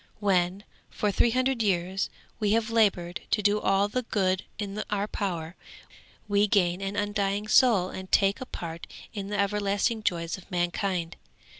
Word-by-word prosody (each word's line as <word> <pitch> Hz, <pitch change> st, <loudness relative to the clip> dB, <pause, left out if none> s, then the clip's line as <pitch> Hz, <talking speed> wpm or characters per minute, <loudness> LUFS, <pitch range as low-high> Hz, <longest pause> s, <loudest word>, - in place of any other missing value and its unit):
When, 190 Hz, -1 st, +1 dB, 0.3 s
for 210 Hz, -, -1 dB
three 235 Hz, -, +3 dB
hundred 255 Hz, +1 st, +1 dB
years, 190 Hz, -2 st, 0 dB, 0.3 s
we 210 Hz, -2 st, +2 dB
have 225 Hz, 0 st, +1 dB
laboured 190 Hz, -6 st, +2 dB
to 210 Hz, -, +1 dB
do 205 Hz, +1 st, +3 dB
all 195 Hz, +1 st, +3 dB
the 250 Hz, +5 st, -1 dB
good 190 Hz, -5 st, 0 dB
in 205 Hz, 0 st, -4 dB
our 205 Hz, 0 st, -1 dB
power, 175 Hz, -5 st, -3 dB, 0.7 s
we 205 Hz, 0 st, +3 dB
gain 185 Hz, -3 st, +2 dB
an 195 Hz, +1 st, -3 dB
undying 205 Hz, 0 st, -1 dB
soul 215 Hz, -5 st, +5 dB
and 190 Hz, 0 st, -8 dB
take 200 Hz, +5 st, +3 dB
a 260 Hz, -, -5 dB
part 170 Hz, -5 st, -7 dB, 0.3 s
in 200 Hz, -3 st, -5 dB
the 205 Hz, 0 st, -2 dB
everlasting 205 Hz, +2 st, +1 dB
joys 170 Hz, -2 st, -1 dB
of 185 Hz, -, -18 dB
mankind. 175 Hz, -1 st, -1 dB
200 Hz, 160 wpm, -27 LUFS, 185-210 Hz, 0.7 s, soul